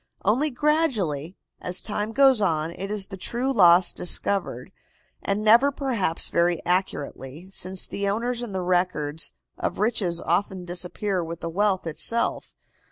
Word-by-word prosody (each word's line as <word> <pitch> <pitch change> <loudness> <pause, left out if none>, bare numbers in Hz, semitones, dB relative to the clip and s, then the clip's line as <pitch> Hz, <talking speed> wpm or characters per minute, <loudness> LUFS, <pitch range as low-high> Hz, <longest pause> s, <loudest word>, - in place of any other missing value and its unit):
Only 250 +10 +2
gradually, 240 - 0 0.2
as 180 +1 -3
time 210 0 -3
goes 265 -1 +5
on, 160 -4 0
is 195 +3 -3
the 195 -1 -9
true 245 +8 -1
loss 175 -4 +6
discovered, 195 +2 -1 0.5
and 200 +1 -1
never 235 +6 +6
perhaps 235 - -1
very 170 0 +1
accurately, 175 -2 -2
since 185 -1 -3
the 200 0 -2
owners 235 +4 -2
and 225 -5 -6
the 185 - -2
records 175 -4 -1 0.2
of - - -2
riches 200 -5 0
often 180 +2 -1
disappear 180 +2 -2
with 165 0 -7
the 165 - -3
wealth 195 +1 0
itself. 230 +9 -1
190 Hz, 140 wpm, -25 LUFS, 175-225 Hz, 0.5 s, loss